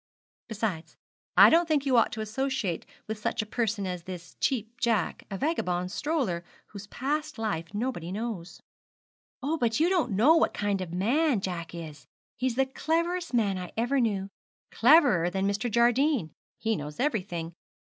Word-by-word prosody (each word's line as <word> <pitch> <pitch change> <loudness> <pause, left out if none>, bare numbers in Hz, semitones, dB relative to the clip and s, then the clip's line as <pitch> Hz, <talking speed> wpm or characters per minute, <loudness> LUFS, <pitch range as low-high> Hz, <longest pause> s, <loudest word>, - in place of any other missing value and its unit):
'Besides, 210 -7 -4 0.4
I - - +9
don't 335 +1 +4
think 300 -3 +1
you 265 -2 +2
ought 230 - +4
to 220 - -4
associate 220 -4 -2 0.2
with 220 0 -5
such 215 - -1
a - - -9
person 215 -2 -1
as 180 -1 -4
this 180 0 -9
Cheap 235 -3 -1
Jack 225 -7 0
a 195 - -4
vagabond 180 - -1
stroller, 245 - -1 0.3
whose 200 -1 -9
past 300 +6 -3
life 195 -7 -3
nobody 205 -6 -3
knows.' 200 -4 -5 0.8
'Oh, 310 +4 0
but 230 -1 +1
you 330 +3 +4
don't 340 - +1
know 250 +12 +5
what - - +2
kind 205 -2 0
of 180 -3 -5
man 240 - +2
Jack 175 -3 -5
is 155 -4 -9 0.3
he's 255 -1 -1
the 270 +1 +3
cleverest 335 +3 -1
man 200 -5 +1
I 180 - -7
ever 245 +5 +1
knew 200 -4 0 0.4
cleverer 245 - +5
than 190 +2 -1
Mr. 200 +4 -1
Jardine; 240 - +2 0.3
he 225 0 0
knows 150 -3 -7
everything. 185 - -2
220 Hz, 165 wpm, -28 LUFS, 185-265 Hz, 0.8 s, I